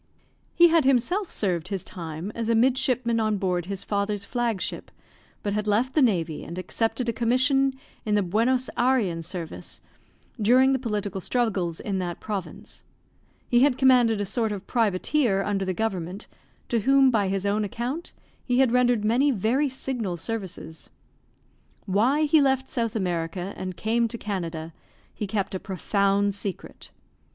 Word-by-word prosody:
He 345 0 +7
had 330 -1 +4
himself 275 - +2
served 180 -4 -1
his 190 -2 -1
time 165 +2 -6
as 230 -1 -3
a 230 - +3
midshipman 245 -1 +2
on 215 -1 +1
board 180 -2 -1
his 200 0 -4
father's 200 0 -2
flag 235 -3 -1
ship, - - -4 0.5
but 205 - -1
had 210 0 -2
left 235 +6 +1
the 305 - +3
navy 175 - +1
and 170 +3 -8
accepted 225 +6 -1
a 235 - 0
commission 260 +3 +2 0.3
in 210 -1 0
the 205 - +2
Buenos 235 +7 +1
Ayrean 235 -10 +2
service 170 -1 -7 0.6
during 255 +5 +5
the 265 - +1
political 205 -5 -3
struggles 195 -8 -1
in 195 -2 -2
that 175 -2 -4
province; 200 -4 -6 0.6
he 240 - +3
had 265 0 +4
commanded 245 -5 +4
a 205 - -1
sort 220 +2 -1
of 200 -1 -5
privateer 220 0 +1
under 195 -1 -1
the 185 - -1
government, 190 -1 -3 0.4
to 235 - +1
whom, 270 +3 +4
by 210 -4 +1
his 195 0 -1
own 205 +1 +1
account, 245 - -4 0.3
he 245 -1 0
had 260 -2 +4
rendered 245 -3 +2
many 250 +7 +3
very 255 +5 +1
signal 245 -8 -3
services. 185 -5 -6 1.0
Why 235 +10 +2
he 305 0 +4
left 265 -1 +2
South 230 -4 -2
America 175 -1 -2
and 185 -2 -6
came 230 +2 +1
to 235 - -6
Canada 170 -6 -4 0.4
he 210 - -4
kept 195 -1 -2
a 190 - -2
profound 200 +2 0
secret. 200 -2 -6
215 Hz, 160 wpm, -25 LUFS, 190-250 Hz, 1.0 s, He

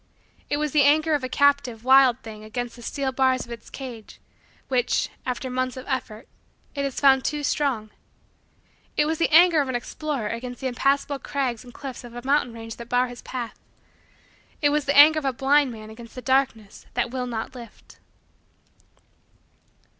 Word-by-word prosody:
It 290 - 0
was 300 -1 -1
the 300 - +4
anger 310 +3 +4
of 290 -3 0
a 255 - -3
captive, 280 -5 +2
wild 260 -1 +5
thing 215 -1 -9
against 245 +2 -5
the 240 - -13
steel 270 +3 -2
bars 260 -1 +1
of 235 - -13
its 230 -2 -9
cage, 245 -5 -9 0.5
which, 250 -2 +1 0.2
after 250 +1 -3
months 255 0 -2
of 255 - -7
effort, 250 -3 -4 0.5
it 280 - -2
has 275 -2 -3
found 265 -2 +5
too 295 -1 -2
strong. 255 -8 -1 1.1
It 295 - +4
was 315 +1 -1
the 335 - +2
anger 330 -1 +7
of 275 - -3
an 255 - -2
explorer 270 -1 -3
against 245 +3 -5
the 265 - -7
impassable 275 +2 0
crags 260 -5 -2
and 245 - -13
cliffs 265 -1 -8
of 240 -1 -11
a 240 +1 -8
mountain 275 -3 +2
range 225 0 -8
that 235 0 -10
bars 250 0 +2
his 245 - -10
path. 245 -3 -6 1.0
It 290 - +3
was 295 0 0
the 280 - +1
anger 310 +2 +8
of 295 - -8
a 270 - +2
blind 275 +1 +3
man 215 -1 -10
against 230 +1 -12
the 255 - -6
darkness 255 -6 0
that 240 -1 0
will 250 -1 -3
not 230 0 -4
lift. 235 -4 -13
260 Hz, 185 wpm, -24 LUFS, 240-280 Hz, 1.1 s, anger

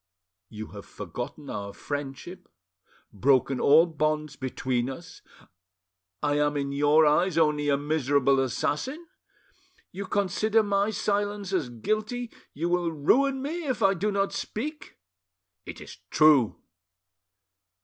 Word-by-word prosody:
"You 110 0 -8
have 100 -1 -11
forgotten - - -7
our 100 -1 -6
friendship, 145 +5 -6 0.6
broken 130 +4 +2
all 155 +4 +6
bonds 155 -2 -1
between 130 -1 -2
us: 165 +6 -10 1.0
I 145 0 +1
am 145 0 +1
in 140 -1 -2
your 145 +2 +4
eyes 165 +3 +2
only 150 -2 +2
a 140 - +3
miserable 140 -2 +2
assassin? 190 - -2 0.9
You 195 +1 -6
consider 210 +3 +1
my 200 0 +1
silence 205 -2 -2
as 160 -9 0
guilty, 215 - -3 0.2
you 165 +4 -3
will 175 -1 0
ruin 265 - +2
me 325 +4 -4
if 255 -4 -1
I 195 0 +5
do 200 +3 -1
not 195 0 0
speak?" 300 +8 -5 0.7
"It - - -7
is - - -10
true." 150 -7 +4
155 Hz, 125 wpm, -27 LUFS, 140-205 Hz, 1.0 s, all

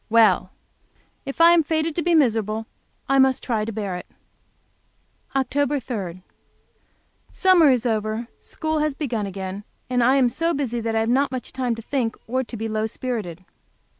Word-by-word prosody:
Well, 225 0 +4 0.8
if 275 - -5
I 335 +1 +8
am 345 -1 +6
fated 315 +1 -1
to 345 - 0
be 345 +1 +2
miserable, 225 -6 +1 0.4
I 275 0 +3
must 265 -1 +3
try 220 -4 -1
to 225 - -4
bear 200 -4 -3
it. 180 - -10 1.3
Oct. 280 0 0
3. 185 -7 -5 1.1
Summer 365 -5 +5
is 250 -2 +2
over, 220 0 -1
school 315 -1 -3
has 300 -2 0
begun 235 -9 -2
again, 195 +1 -6 0.3
and 245 -1 +2
I 255 +3 +4
am 265 -2 +4
so 330 +7 -1
busy 250 -4 -2
that 225 0 -2
I 220 - +2
have 225 - 0
not 270 +3 +2
much 255 -1 -5
time 250 -3 -1
to 225 - -9
think, 240 -3 -1 0.3
to 235 - -7
be 225 +1 -3
low 215 0 -1
spirited. 210 -8 -4
245 Hz, 170 wpm, -23 LUFS, 220-280 Hz, 1.3 s, I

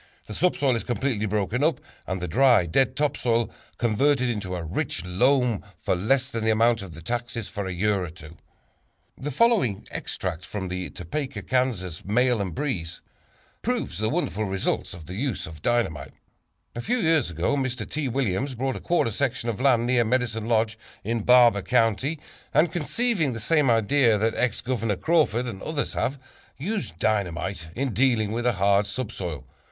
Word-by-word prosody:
The 105 - -8
subsoil 140 -4 +2
is 115 - -2
completely 120 -3 -1
broken 105 +5 0
up 160 0 +2 0.3
and 95 0 -2
the 90 - -3
dry, 120 0 +5
dead 130 +10 +2
top 145 0 +1
soil 115 -2 +1 0.3
converted 125 +3 +2
into 100 -5 -3
a 85 - -4
rich 80 +2 -3
loam 125 +5 +2 0.2
for - - 0
less 130 +8 +1
than 115 -2 -3
the 110 - +2
amount 115 +1 +3
of 90 -5 -9
the 85 - -10
taxes 115 0 -3
for 100 -3 -4
a - - -3
year 100 +2 +1
or 90 - -5
two. 80 -1 -12 0.8
The 145 - -5
following 185 - +2
extract 80 - -3
from 95 +1 -5
the 90 0 -4
Topeka, 135 - -5
Kansas, 115 -10 -1
"Mail 120 +2 +2
and 90 -5 -4
Breeze" 90 - -3 0.6
proves 230 - -2
the 110 0 +1
wonderful 125 - -1
results 95 -1 -2
of 85 -2 -11
this 90 +3 -7
use 130 -2 -2
of 80 -4 -10
dynamite: 115 -11 0 0.6
"A 120 - -3
few 245 - 0
years 160 - +2
ago 85 - 0
M. 135 - 0
T. 135 +4 -3
Williams 130 +1 -1
bought 130 +2 -1
a - - -6
quarter 170 -9 +1
section 125 0 -1
of 115 +1 -3
land 125 -4 +4
near 120 -1 +3
Medicine 115 -2 0
Lodge 110 -1 +1 0.2
in 115 +2 -1
Barber 120 -3 +6
County, 125 - +1 0.4
and, 155 +2 +4
conceiving 175 - 0
the 115 - -5
same 145 +3 +2
idea 115 +1 +4
that 110 +2 +1
Ex 125 -4 0
Governor 115 -4 -1
Crawford 145 - +2
and 105 -6 -6
others 155 -2 -2
have, 135 +4 -1 0.4
used 185 - -3
dynamite 95 -4 -1
in 130 -1 -1
dealing 115 -3 +2
with 120 +2 -1
a 120 - +3
hard 100 +1 +3
subsoil. 100 - -4
115 Hz, 180 wpm, -25 LUFS, 100-135 Hz, 0.8 s, Barber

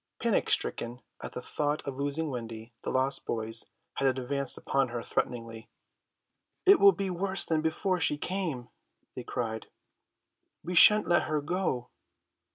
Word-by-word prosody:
Panic - - +1
stricken 120 +2 -1 0.2
at - - -7
the 125 - -6
thought 150 +2 -2
of 135 - -4
losing 145 +3 -2
Wendy 115 -1 -7
the - - -4
lost 130 +1 +1
boys 115 0 0 0.3
had 135 - +2
advanced 135 +1 -1
upon 135 -1 0
her 120 -1 -5
threateningly. 115 -1 -4 1.0
"It 395 +1 +7
will 200 - +8
be 190 +1 -3
worse 190 +2 +2
than 160 -1 0
before 180 +4 -1
she 150 -2 +1
came," 160 -9 -4 0.5
they - - -5
cried. 110 -2 -4 1.0
"We 175 +3 -4
shan't 210 +4 +7
let 175 0 +3
her 155 -1 0
go." 145 -5 -2
140 Hz, 150 wpm, -29 LUFS, 120-175 Hz, 1.0 s, will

